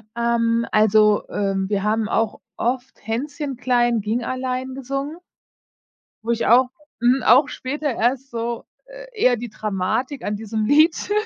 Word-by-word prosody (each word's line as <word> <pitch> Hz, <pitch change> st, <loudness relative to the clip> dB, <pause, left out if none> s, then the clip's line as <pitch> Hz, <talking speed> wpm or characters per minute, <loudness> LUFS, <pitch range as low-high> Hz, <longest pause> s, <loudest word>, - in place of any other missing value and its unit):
Ähm, 235 Hz, 0 st, +1 dB
also, 215 Hz, 0 st, +4 dB
ähm, 195 Hz, -1 st, -1 dB
wir 200 Hz, -2 st, 0 dB
haben 215 Hz, 0 st, +1 dB
auch 225 Hz, -1 st, 0 dB, 0.2 s
oft 250 Hz, +2 st, -2 dB
„Hänschen 275 Hz, +4 st, -3 dB
klein, 240 Hz, -2 st, +2 dB
ging 225 Hz, +4 st, -1 dB
allein” 255 Hz, +1 st, -3 dB
gesungen 275 Hz, +4 st, -4 dB, 1.1 s
wo 235 Hz, -, -1 dB
ich 235 Hz, -, 0 dB
auch 250 Hz, +2 st, +5 dB, 0.3 s
mhm, 250 Hz, +3 st, +3 dB
auch 255 Hz, +6 st, +6 dB
später 290 Hz, +1 st, -3 dB
erst 255 Hz, +4 st, -1 dB
so, 235 Hz, 0 st, -4 dB, 0.2 s
äh, -, -, -11 dB
eher 255 Hz, -, +3 dB
die 235 Hz, 0 st, -6 dB
Dramatik 215 Hz, +7 st, -2 dB
an 210 Hz, -, -1 dB
diesem 220 Hz, 0 st, -3 dB
Lied 310 Hz, -, +3 dB
240 Hz, 145 wpm, -22 LUFS, 220-265 Hz, 1.1 s, auch